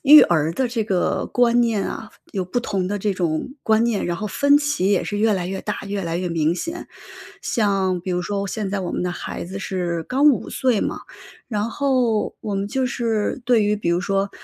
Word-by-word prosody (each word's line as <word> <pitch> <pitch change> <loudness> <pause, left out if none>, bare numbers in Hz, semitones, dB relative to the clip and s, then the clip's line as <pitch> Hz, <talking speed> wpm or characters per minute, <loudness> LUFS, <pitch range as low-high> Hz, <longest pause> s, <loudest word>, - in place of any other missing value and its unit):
育 300 +1 +10
儿 160 -2 +2
的 260 - +1
这 235 -2 -1
个 190 -4 0
观 240 -1 +3
念 225 -4 +1
啊， 220 - -6 0.2
有 195 - -1
不 185 +7 -2
同 195 -6 -2
的 205 +1 -2
这 205 +1 0
种 170 +3 -1
观 220 +1 +3
念， 235 -4 0
然 175 -1 -1
后 210 - -3
分 285 +7 +4
歧 290 -10 +1
也 195 - +2
是 205 - -3
越 215 0 +3
来 180 -2 -2
越 190 +1 -4
大 210 - -3
越 200 0 -3
来 165 -1 -2
越 180 0 -2
明 165 0 +1
显。 330 - -5 0.5
像 195 -4 +1
比 185 - -5
如 180 0 0
说 200 +2 -2
我 200 - -2
现 200 0 -3
在 200 0 -1
我 180 -2 -3
们 - - -2
的 180 - -1
孩 - - -5
子 190 +3 -6
是 175 -4 -2
刚 265 - +1
5 265 - -1
岁 255 -6 +1
嘛， - - -2 0.5
然 210 -1 -1
后 250 -4 +1
我 210 - -3
们 195 0 -1
就 260 +4 0
是 230 -3 -1
对 240 -3 +4
于 210 0 +2
比 190 -5 -1
如 170 +1 +2
说， 195 0 0
205 Hz, 240 characters per minute, -22 LUFS, 185-235 Hz, 0.5 s, 育